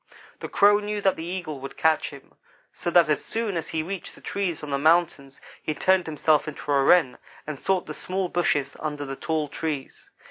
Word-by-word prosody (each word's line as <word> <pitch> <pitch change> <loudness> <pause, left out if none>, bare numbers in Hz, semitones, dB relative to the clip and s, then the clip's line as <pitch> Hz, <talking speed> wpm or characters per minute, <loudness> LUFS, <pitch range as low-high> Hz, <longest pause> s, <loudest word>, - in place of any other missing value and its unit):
"The - - -6
Crow 205 +1 +5
knew 210 0 -3
that 195 -1 +3
the 160 - -6
Eagle 175 -4 -5
would 135 +1 -8
catch 160 -1 +2
him, 140 -2 -14 0.4
so - - -3
that 175 -1 +5
as 150 -1 0
soon 225 -4 -2
as 165 -1 -3
he 160 -1 -2
reached 190 +2 -6
the - - -15
trees 185 -6 -3
on 150 - -5
the 140 - 0
mountains 155 -3 +2 0.2
he 155 - -3
turned 185 0 +2
himself 155 0 +2
into 145 -1 -5
a 140 -1 +4
Wren 160 -3 +4 0.3
and 150 -3 -6
sought 190 -2 0
the - - -6
small 185 0 -2
bushes 150 -6 0
under 150 -2 -4
the 135 0 -5
tall 155 +1 -1
trees. 145 -2 -5
160 Hz, 210 wpm, -25 LUFS, 145-180 Hz, 0.4 s, Crow